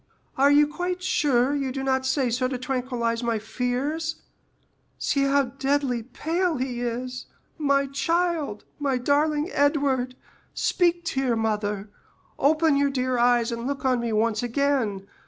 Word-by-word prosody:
"Are 275 +2 +4
you 290 +1 +6
quite 355 +4 -4
sure 285 -8 +2
you 275 -2 -1
do 270 +1 -4
not 260 -1 +1
say 260 -2 +1
so 255 +2 +1
to 255 0 -3
tranquillize 245 -2 -2
my 235 -2 0
fears? 265 +9 -2 0.8
See 275 -1 +1
how 280 0 +3
deadly 270 -1 -1
pale 325 +8 -1
he 250 -1 -3
is! 250 +1 -4 0.3
My 280 -2 +2
child, 325 -4 -1 0.2
my 275 -3 0
darling 295 +5 +1
Edward; 280 -3 +1 0.4
speak 345 -1 +1
to 275 - -1
your 250 -3 +1
mother—open 220 +8 -1
your 280 0 +3
dear 255 -2 -1
eyes 240 -1 +3
and 235 +1 -4
look 280 -1 -3
on 255 -2 +3
me 235 -1 -2
once 220 0 +1
again! 245 -6 0
265 Hz, 145 wpm, -25 LUFS, 245-290 Hz, 0.8 s, you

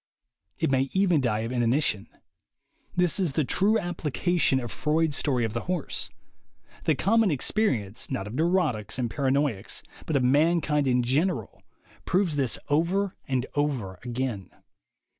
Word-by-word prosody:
It 160 - 0
may 135 0 +2
even 185 -6 +3
die 110 -4 0
of 115 +2 -4
inanition. 120 -3 +1 0.9
This 180 +1 +1
is 175 -7 +1
the 155 - +1
true 200 - +3
application 175 -4 0
of 120 -2 -5
Freud's 155 -1 +1
story 130 -5 0
of 110 - -4
the 115 - -4
horse. 180 -5 -2 0.8
The 155 - +3
common 220 +6 +3
experience, 130 - 0
not 95 - -3
of 105 - -7
neurotics 155 - 0
and 120 -3 -1
paranoiacs, 135 -5 -1 0.2
but 160 - -1
of 135 - +3
mankind 150 +1 +2
in 125 -1 +2
general, 135 - -1 0.4
proves 180 -4 +1
this 135 -4 +1
over 180 +6 +1
and 130 -2 0
over 130 -11 -1
again. 120 -5 -3
140 Hz, 140 wpm, -26 LUFS, 120-170 Hz, 0.9 s, even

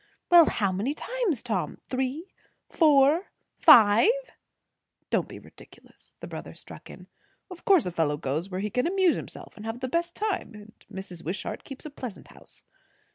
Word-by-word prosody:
Well, 345 -2 +9
how 200 -3 0
many 215 +11 -2
times, 445 - -2
Tom? 195 -10 -3
Three 265 +7 -3 0.4
four 305 +2 +4 0.3
five." 215 - +7 1.0
"Don't - - +1
be - - -10
ridiculous!" - - -15
the - - -7
brother - - -8
struck - - -12
in. - - -12 0.5
"Of 360 - -11
course 380 -6 +4
a 180 - -3
fellow 160 -3 0
goes 150 +5 -3
where 185 0 -4
he 210 0 -3
can 250 +5 0
amuse 375 -1 +2
himself - - -8
and 210 - -11
have 225 +2 -5
the 260 - -3
best 340 +5 -2
time; 400 - -3
and 210 +1 -15
Mrs. 185 -3 -8
Wishart 205 +6 -5
keeps 270 +1 -11
a 305 - -7
pleasant 250 -7 -9
house." - - -18
250 Hz, 170 wpm, -26 LUFS, -, 1.0 s, Well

